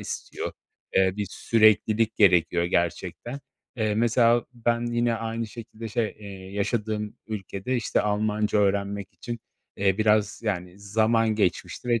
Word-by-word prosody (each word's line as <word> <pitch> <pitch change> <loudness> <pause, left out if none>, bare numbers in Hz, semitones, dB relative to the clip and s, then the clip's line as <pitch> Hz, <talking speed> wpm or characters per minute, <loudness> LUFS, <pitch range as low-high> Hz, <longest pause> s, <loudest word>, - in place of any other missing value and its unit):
istiyor. - - -5 0.4
Eee, 95 -1 +4
bir 105 -1 -2
süreklilik 110 0 +3
gerekiyor, 85 -4 +4
gerçekten. 85 - -2 0.4
Eee, 110 -2 0
mesela, 115 +1 +3
ben 120 0 0
yine 120 0 +2
aynı 115 0 -3
şekilde, 115 0 -8
şey, 115 +1 0
eee, 105 - -11 0.3
yaşadığım 105 0 -2
ülkede, 105 +3 -3
işte, 115 - +1
Almanca 105 0 +1
öğrenmek 100 -1 0
için, 120 -1 -6 0.4
eee, 95 0 +2
biraz, 105 -1 +2
yani, 90 -3 -3
zaman 110 +2 +2
geçmişti 105 +4 -1
ve 120 -1 +3
110 Hz, 130 wpm, -26 LUFS, 100-115 Hz, 0.4 s, Eee